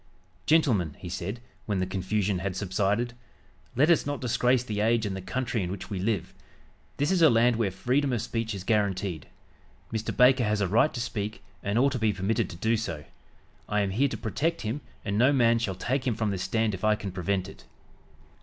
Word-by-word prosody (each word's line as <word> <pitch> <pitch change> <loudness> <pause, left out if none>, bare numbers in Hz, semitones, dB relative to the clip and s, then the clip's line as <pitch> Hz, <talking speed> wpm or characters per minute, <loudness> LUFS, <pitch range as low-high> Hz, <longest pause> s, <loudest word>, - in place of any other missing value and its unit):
"Gentlemen," 115 - +3
he 90 - -8
said, 100 +6 -4 0.3
when 105 -3 0
the 95 - 0
confusion 95 +1 -1
had 95 -1 -3
subsided, 100 +5 0 0.6
"let 145 +7 +4
us 165 - +4
not 145 -1 -3
disgrace 125 0 +2
the 105 -4 -4
age 110 +1 +2
and 100 -2 -2
the 95 - -5
country 120 +3 -2
in 90 - -2
which 100 - -7
we 95 - -2
live. 95 -2 -1 0.6
This 145 +4 +1
is 185 -2 +2
a 160 - +8
land 120 +1 +4
where 115 -4 +1
freedom 130 +9 0
of 120 - 0
speech 115 -2 -3
is 95 - -6
guaranteed. 100 -5 0 0.7
Mr. 110 0 -2
Baker 125 0 +6
has 105 -1 +1
a 100 - +1
right 115 +10 +3
to - - -3
speak, 110 -2 -4 0.2
and 100 +2 -1
ought 135 +3 +4
to 130 - -2
be 110 -2 +2
permitted 100 +3 0
to - - -8
do 110 +6 +1
so. 85 -9 -4 0.7
I 105 0 +2
am 100 -1 0
here 130 +9 +2
to 135 - -5
protect 165 +2 -1
him 115 +7 -3 0.2
and 100 0 0
no 130 +4 +5
man 115 -4 +4
shall 100 -5 -2
take 130 +7 -1
him 120 - +1
from 110 -2 -1
this 95 -2 -3
stand 110 +3 0
if 95 +2 -6
I 110 0 +4
can 100 -2 -6
prevent 95 +1 -1
it." - - -13
110 Hz, 215 wpm, -27 LUFS, 95-120 Hz, 0.7 s, a